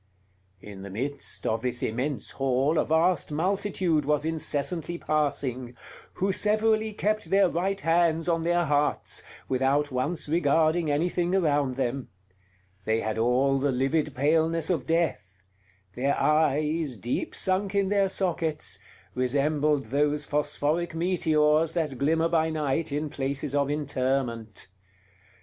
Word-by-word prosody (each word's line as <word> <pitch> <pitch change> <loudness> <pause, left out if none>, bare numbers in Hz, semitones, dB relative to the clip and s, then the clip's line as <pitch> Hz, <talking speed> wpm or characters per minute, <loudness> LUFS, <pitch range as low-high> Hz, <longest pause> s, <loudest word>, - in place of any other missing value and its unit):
In 100 -2 -10
the 100 - -8
midst 135 +8 -4
of 110 0 0
this 125 0 -2
immense 130 +5 -2
hall 135 +4 +1
a - - +1
vast 160 +1 +2
multitude 180 -1 0
was 150 +1 0
incessantly 165 +1 -1
passing, 130 -6 -2 0.4
who 195 +1 0
severally 215 +2 +2
kept 215 +1 -1
their 195 0 +4
right 190 +4 -1
hands 165 -1 +2
on 165 -1 +1
their 175 +1 +1
hearts, 145 0 0 0.3
without 135 +3 +1
once 135 +7 -2
regarding 160 +1 +2
anything 175 +4 0
around 145 -7 +1
them; 130 0 -2 0.7
they 110 +1 0
had 110 0 -2
all 130 +4 +2
the 140 +1 +1
livid 135 +3 0
paleness 160 +4 +1
of 160 -7 -2
death; 160 - -1 0.6
their 135 +5 0
eyes, 150 -2 +1
deep 120 +5 -3
sunk 190 +1 +2
in 200 -1 +2
their 200 -1 +2
sockets, 165 -5 -1 0.3
resembled 140 +1 0
those 145 +1 +1
phosphoric 150 +3 -1
meteors 160 -2 +2
that 155 -7 -2
glimmer 160 +4 +2
by 160 -1 +1
night 155 0 -1
in 150 +2 -2
places 140 0 -3
of 140 -1 +1
interment. 130 -7 -2
150 Hz, 130 wpm, -26 LUFS, 135-170 Hz, 0.7 s, their